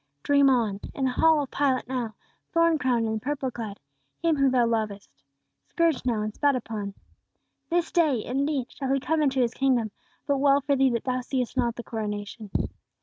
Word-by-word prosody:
Dream 280 -1 +5
on! 225 -6 +1 0.2
In 270 - 0
the 260 - +1
hall 315 +3 +4
of 270 - -9
Pilate 270 -4 +1
now, 245 -4 -3 0.4
thorn 335 -1 +3
crowned 240 -4 +1
and 220 0 -2
purple 270 0 -2
clad, 220 -4 -6 0.4
Him 335 -2 +1
whom 275 -2 +3
thou 250 -2 +3
lovest; 215 -3 -2 0.6
scourged 330 -7 +1
now, 220 -3 +1
and 215 0 -3
spat 285 +2 +2
upon. 215 -5 -4 0.7
This 345 -1 0
day, 300 -10 +2
indeed, 275 0 -1
shall 270 -2 -3
He 275 - +2
come 315 +4 0
into 270 -3 +2
His 235 -1 +1
kingdom, 250 -5 +1 0.3
but 280 -2 +1
well 280 0 +5
for 285 0 +1
thee, 270 0 +4
that 235 -2 -1
thou 255 -1 -1
seest 250 -1 -2
not 240 -2 +1
the 240 - -7
coronation. 210 -1 -5
255 Hz, 190 wpm, -26 LUFS, 230-280 Hz, 0.7 s, Dream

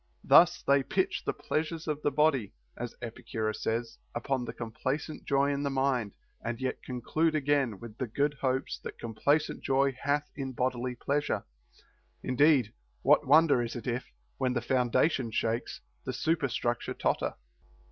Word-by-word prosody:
Thus - - +6
they 140 0 +4
pitch 190 +7 -1
the - - +1
pleasure 160 +2 -2
of 150 -1 -2
the - - +2
body 140 -7 +2 0.2
(as 120 -1 -6
Epicurus 110 -2 -4
says) 115 - -2 0.2
upon 130 -3 -1
the - - -4
complacent 130 +6 -4
joy 140 0 +2
in 140 0 -1
the 140 - 0
mind, 130 -6 0 0.3
and 115 +1 -3
yet 130 -1 -2
conclude 155 +6 0
again 140 -7 +1
with 115 -2 -9
the 130 - -1
good 140 +6 0
hopes 130 0 -1
that - - -8
complacent 140 +7 0
joy 135 0 +2
hath 145 +1 +1
in 135 -2 -4
bodily 125 0 -1
pleasure. 145 +4 -1 0.8
Indeed 130 -4 +3 0.3
what - - +5
wonder 150 -2 +6
is 120 -1 -4
it 120 - -6
if, 125 +1 -3 0.3
when 130 -1 +1
the 120 - 0
foundation 130 +1 +2
shakes, 115 +1 -2 0.2
the - - -3
superstructure 135 -6 -1
totter? - - 0
130 Hz, 155 wpm, -30 LUFS, 120-145 Hz, 0.8 s, Thus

